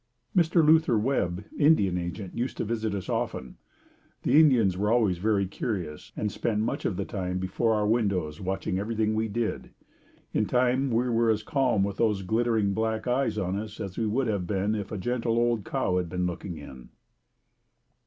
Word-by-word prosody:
Mr. 170 -2 +4
Luther 155 -6 +5
Webb, 105 -6 0
Indian 145 - +4
agent, 90 +2 -4
used 125 +2 -3
to - - -2
visit 110 -1 -2
us 95 - -5
often. 65 - -3 0.7
The 150 - +5
Indians 120 - +4
were 105 +3 0
always 105 -7 +2
very 100 0 +2
curious, 90 -5 -4
and 105 -1 -1
spent 105 0 -1
much 110 - -2
of 90 - -1
the 100 - -2
time 90 -4 -3
before 95 +5 0
our 105 -1 +1
windows 100 -9 0
watching 95 0 -2
everything 110 +1 0
we 110 +1 0
did. 110 +1 -3 0.6
In - - +1
time 125 +2 +2
we 120 +1 +1
were 115 -1 +2
as 110 -1 +1
calm 130 -9 +1
with 100 0 -2
those 105 -4 +1
glittering 110 0 +1
black 110 +1 -1
eyes 125 -3 +1
on 95 -2 -1
us 110 0 -7
as 95 -2 -5
we 115 - -1
would 125 +5 0
have 100 -6 -1
been 100 +2 0
if 105 -2 -4
a 105 - -3
gentle 115 +2 -1
old 120 -3 +1
cow 90 -1 0
had 90 -2 -3
been 90 +1 -1
looking 90 0 -4
in. 65 -4 -11
105 Hz, 185 wpm, -27 LUFS, 95-120 Hz, 0.7 s, Luther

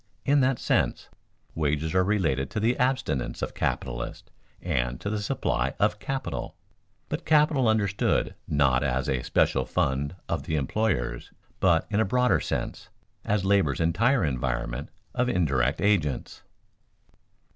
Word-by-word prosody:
In 145 +1 +4
that 130 -1 +2
sense, - - 0 0.4
wages 75 +1 -1
are 95 0 +4
related 80 -10 0
to - - -3
the 115 +3 +2
abstinence 125 - 0
of - - -3
capitalists - - -3 0.3
and - - -1
to 100 - -3
the 105 -1 -1
supply 65 -9 -1
of 105 0 +2
"capital," 135 +3 -4 0.5
but - - -4
capital 150 -4 +3
understood 100 -3 +1
not 70 -3 +3
as 65 -1 0
a 65 -2 0
special - - +2
fund 70 +5 -1
of - - -1
the 80 - 0
employers, 70 - -1 0.3
but, 85 -3 +3
in 105 - +2
a 110 - +3
broader 125 +5 +2
sense, - - -4 0.3
as 100 -2 0
labor's 95 -8 +2
entire 100 - +2
environment 65 -1 -2 0.2
of 125 0 +1
indirect 70 - +1
agents. 85 -11 0
90 Hz, 135 wpm, -26 LUFS, 65-110 Hz, 0.5 s, In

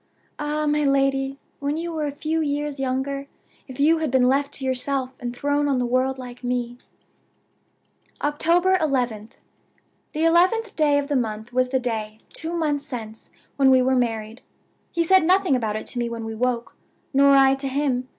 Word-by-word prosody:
Ah, 300 +1 -1
my 300 0 +1
lady, 275 -1 +1 0.2
when 285 +2 -2
you 340 +1 -3
were 305 -2 -2
a - - -3
few 310 +3 -2
years 290 -1 -2
younger, 270 +1 -2 0.4
if 260 -1 -10
you 320 +3 +4
had 315 -2 -1
been 255 -1 +3
left 280 +2 +1
to 270 - -6
yourself, 260 0 -1
and 245 -1 -4
thrown 285 +3 0
on 275 -2 +1
the 250 - 0
world 255 +2 +1
like 250 -1 -10
me 245 0 -2 0.7
" - - -36
"October 340 +6 +2
11th. 245 -8 -1 0.8
The 315 +2 0
eleventh 365 +7 +3
day 295 -2 +3
of 285 0 -1
the 290 - -1
month 225 -1 -3
was 255 0 +2
the 260 0 +1
day 220 -3 -3 0.2
(two 325 +1 -4
months 300 -4 0
since) 225 -5 -8 0.3
when 270 -1 +5
we 260 -1 +5
were 260 +1 +2
married. 225 -1 -2 0.5
He 340 - +1
said 375 +1 +5
nothing 370 -3 +3
about 220 -4 -1
it 215 - -4
to 245 - -4
me 240 0 -1
when 230 -1 -5
we 225 - -5
woke, 240 +1 -2 0.4
nor 280 +1 +6
I 270 0 +6
to 270 0 -4
him. 265 -2 -1
270 Hz, 190 wpm, -23 LUFS, 250-295 Hz, 0.8 s, nor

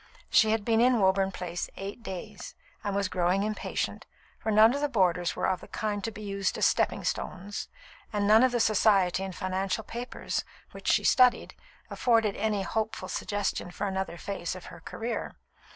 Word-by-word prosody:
She 220 - +5
had 220 -1 +1
been 225 -1 +3
in 245 -1 +4
Woburn 190 0 +3
Place 175 -2 -4
eight 200 +4 -6
days, 200 -1 -7 0.3
and 200 -2 -2
was 200 -1 +1
growing 185 +2 +1
impatient, 215 0 -3 0.3
for 220 - -2
none 215 +3 +7
of 285 - -2
the 295 - +1
boarders 180 -7 +1
were - - -1
of 185 -2 0
the - - -11
kind 205 -2 -3
to - - -1
be 215 -1 -9
used 200 -1 -1
as - - +2
"stepping - - +1
stones," 195 +3 -4 0.4
and 205 -2 0
none 215 +2 +6
of 255 0 +4
the 240 - 0
Society 195 -4 +3
and 190 -2 -5
financial 190 +2 -2
papers, 240 +4 -4 0.3
which - - -10
she - - +3
studied, 250 -1 +4 0.4
afforded 225 -4 +2
any 210 -3 0
hopeful 220 +3 -3
suggestion 205 -3 -2
for 180 - -4
another 190 -3 -3
phase 190 -1 -4
of 185 - -10
her 170 - -11
career. 225 +7 -5
205 Hz, 185 wpm, -28 LUFS, 190-220 Hz, 0.4 s, none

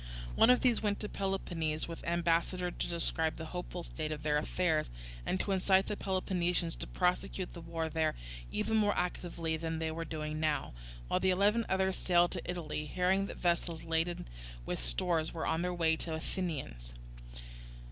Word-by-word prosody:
One 225 - +6
of 250 - +6
these 250 -3 +3
went 205 -1 0
to 210 - -2
Peloponnese 170 -5 -1
with 165 -1 -7
ambassadors 170 +1 +1
to - - 0
describe 160 -1 0
the 160 - -6
hopeful 180 0 -4
state 155 -2 -4
of 150 -1 -4
their 150 -1 +3
affairs, 160 0 +1 0.4
and 185 - +1
to 200 - -1
incite 190 0 +4
the 210 - -2
Peloponnesians 180 -3 0
to - - -4
prosecute 180 0 0
the 170 - -8
war 165 -1 -2
there 160 -1 +1 0.4
even 220 - +1
more 205 -1 +3
actively 170 -2 -1
than 160 0 -2
they 160 0 -1
were 165 +1 -3
now - - -12
doing, 155 -1 -3 0.7
while - - +2
the 190 - +2
eleven 205 +5 +3
others 190 0 +2
sailed 175 -1 +4
to - - -2
Italy, 155 -4 -3
hearing 185 +4 +2
that - - -7
vessels 170 -2 0
laden 165 - -1 0.4
with - - -2
stores 160 - +1
were 165 - -2
on 160 - +1
their 180 +1 0
way 165 -2 +2
to 170 - -5
the 160 - -1
Athenians. 140 - -4
170 Hz, 180 wpm, -33 LUFS, 160-185 Hz, 0.7 s, One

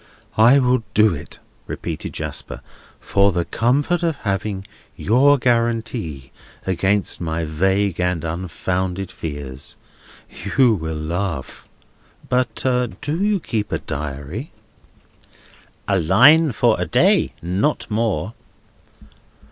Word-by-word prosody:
"I 120 +5 +6
will 125 -2 +3
do 110 -2 +5
it," 70 - -9 0.3
repeated - - -5
Jasper, - - -5 0.4
"for 100 0 +2
the 85 -1 -1
comfort 135 - +1
of 165 -3 0
having 100 -2 -3 0.3
your 135 +7 +4
guarantee 115 - -1 0.3
against 95 +2 0
my 80 -1 -2
vague 95 +4 0
and 90 -2 0
unfounded 90 +2 -3
fears. 70 -4 -6 0.8
You 125 -4 +6
will 80 -5 -3
laugh—but 90 - -4 0.4
do 160 +6 -2
you 205 -1 +2
keep 110 -9 -3
a - - +1
Diary?" 75 - -6 1.4
"A 100 -2 +2
line 135 - +6
for 115 -4 +2
a 90 - -1
day; - - +3
not 95 - 0
more." 110 -4 -1
100 Hz, 105 wpm, -21 LUFS, 85-120 Hz, 1.4 s, I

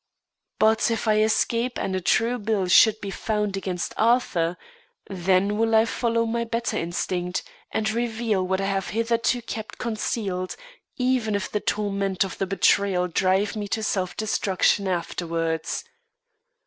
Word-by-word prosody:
But, 220 +1 +3
if 225 0 -2
I 215 0 +4
escape 230 +3 +1
and 190 -1 -2
a 185 - -1
true 230 +7 +2
bill 205 -3 0
should 215 +4 +6
be 200 - -4
found 210 -1 -1
against 185 -2 -3
Arthur, 200 -7 +2 0.5
then 190 +2 +1
will 225 0 +2
I 220 0 +6
follow 230 0 0
my 235 +1 -1
better 230 0 -2
instinct, 175 +1 -2 0.3
and 215 - -1
reveal 225 -3 -1
what 190 +1 0
I 195 - -1
have 195 -1 -1
hitherto 230 +2 0
kept 220 -1 -6
concealed, 210 -5 -2 0.4
even 250 -4 +1
if 200 - -3
the 210 - 0
torment 200 -3 0
of 190 - -6
the 195 - 0
betrayal 195 -1 +2
drive 190 +4 +1
me 210 -1 -3
to 220 +2 -2
self 185 -4 -1
destruction 200 -2 +1
afterwards. 165 -2 -2
205 Hz, 150 wpm, -24 LUFS, 185-225 Hz, 0.5 s, should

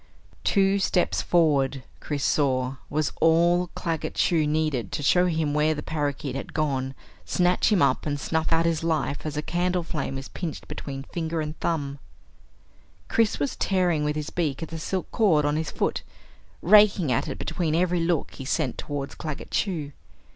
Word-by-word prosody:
Two 195 0 +3
steps 185 -2 +1
forward, 140 -6 +2 0.2
Chris 145 -2 -3
saw, 130 -2 +1
was 150 0 0
all 170 +2 +4
Claggett 160 -2 -3
Chew 160 -3 +2
needed 150 -8 0
to 145 - -2
show 180 +5 +4
him 160 -4 0
where 150 +1 +2
the 150 - -5
parakeet 145 -3 -2
had 135 - -6
gone, 135 -3 -1 0.3
snatch 180 +4 +2
him 200 -5 +4
up, - - +1
and 145 -1 -1
snuff 160 +2 -1
out 165 0 +3
his 165 -1 0
life 155 -2 -1
as 150 -1 -4
a 150 - -1
candleflame 175 -6 -1
is 135 - -6
pinched 170 -4 -6
between 135 -1 -6
finger 160 +2 -3
and 155 0 -3
thumb. 145 -4 -2 1.1
Chris 225 -2 +2
was 145 -1 -1
tearing 180 -5 +1
with 150 0 0
his 150 -1 -4
beak 160 -3 -1
at 160 - -6
the 165 - -6
silk 185 +3 -2
cord 165 -10 +3
on 145 0 +1
his 160 0 -1
foot, - - -1 0.6
raking 200 -6 +6
at 120 - +1
it - - -4
between 160 -4 -1
every 180 +1 +2
look 165 -2 0
he 135 - -8
sent 135 0 -1
towards 140 -1 -4
Claggett 155 -3 -6
Chew. 160 -8 -1
155 Hz, 175 wpm, -25 LUFS, 145-175 Hz, 1.1 s, raking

